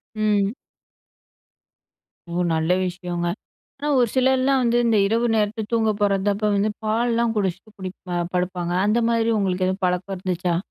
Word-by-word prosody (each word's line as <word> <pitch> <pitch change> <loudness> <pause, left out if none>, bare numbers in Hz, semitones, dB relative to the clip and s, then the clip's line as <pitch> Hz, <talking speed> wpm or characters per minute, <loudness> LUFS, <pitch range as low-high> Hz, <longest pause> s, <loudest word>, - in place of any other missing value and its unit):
ம். 210 -1 +1 1.8
ஓ! - - -5 0.2
நல்ல 160 +2 +1
விஷயங்க. 175 -1 -3 0.5
ஆனா, 295 - -3
ஒரு 245 - +4
சிலர்லாம் 260 +1 +3
வந்து 240 0 +2
இந்த 225 -2 +3
இரவு 230 +3 +1
நேரத்துல 215 +1 0
தூங்க 225 -1 +2
போறப்போ 205 +1 +1
வந்து 205 +2 +1
பால்லாம் 230 +1 +1
குடிச்சிட்டு 195 +1 -2
குடி 185 -1 -5 0.4
படுப்பாங்க. 180 -1 -1
அந்த 215 +3 +2
மாரி 230 -1 +1
உங்களுக்கு 185 -2 0
எதுவும் 190 +1 -3
பழக்கம் 180 +2 -1
இருந்துச்சா? 180 -1 -1
205 Hz, 135 wpm, -23 LUFS, 185-230 Hz, 1.8 s, ஒரு